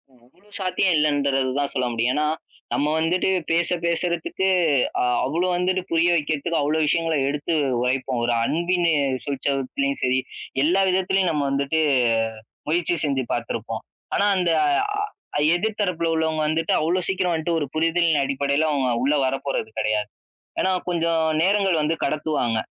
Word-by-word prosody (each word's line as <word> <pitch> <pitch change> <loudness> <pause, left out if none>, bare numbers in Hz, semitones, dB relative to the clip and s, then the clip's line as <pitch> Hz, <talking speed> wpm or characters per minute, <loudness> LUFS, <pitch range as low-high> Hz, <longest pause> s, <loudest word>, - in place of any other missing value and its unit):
அவ்வளோ 165 - -26
சாத்தியம் 185 0 +1
இல்லன்றது 140 -3 +1
தான் 140 -1 -1
சொல்ல 130 -2 0
முடியும். 115 +2 +1
ஏன்னா, 150 +1 +1 0.5
நம்ம 145 - +1
வந்துட்டு 175 +4 +1 0.2
பேச 170 +1 +2 0.2
பேசுறதுக்கு, 170 +2 -1 0.5
அ - - +2 0.2
அவ்ளோ 165 +7 0
வந்துட்டு 180 +1 0
புரிய 165 +1 +3
வைக்கிறதுக்கு 155 +1 -1
அவ்ளோ 150 +2 0
விஷயங்கள 165 +1 +1
எடுத்து 145 +3 -2 0.3
உரைப்போம். 125 0 -1
ஒரு 120 - +1
அன்பினு 175 +3 +1 0.3
சுழிசத்தலயும் 140 - -2
சரி, 130 0 +2 0.5
எல்லா 180 +5 +3
விதத்திலயும் 190 0 +1
நம்ம 150 -3 0
வந்துட்டு 140 +3 0 0.9
முயற்சி 170 +2 +1
செஞ்சு 135 -3 0
பாத்துருப்போம். - - -3 0.3
ஆனா 200 - +2
அந்த 180 -2 +1 0.9
அ - - +2
எதிர்தரப்பல 180 -3 -1
உள்ளவங்க 160 -1 0
வந்துட்டு 160 +1 0
அவ்ளோ 175 +4 +1
சீக்கிரம் 185 -2 0
வந்துட்டு 165 +1 -1
ஒரு 145 - -1
புரிதலின் 165 -1 +2
அடிப்படையில 140 +3 0
அவங்க 135 -3 0
உள்ள 140 +3 +2
வரப்போறது 135 -3 -2
கெடையாது. 110 -1 0 0.5
ஏனா 190 - +2 0.2
கொஞ்சம் 165 -2 +1 0.2
நேரங்கள் 195 -3 +2
வந்து 155 +2 +1
கடத்துவாங்க. 150 -7 -1
160 Hz, 135 wpm, -23 LUFS, 140-175 Hz, 0.9 s, புரிய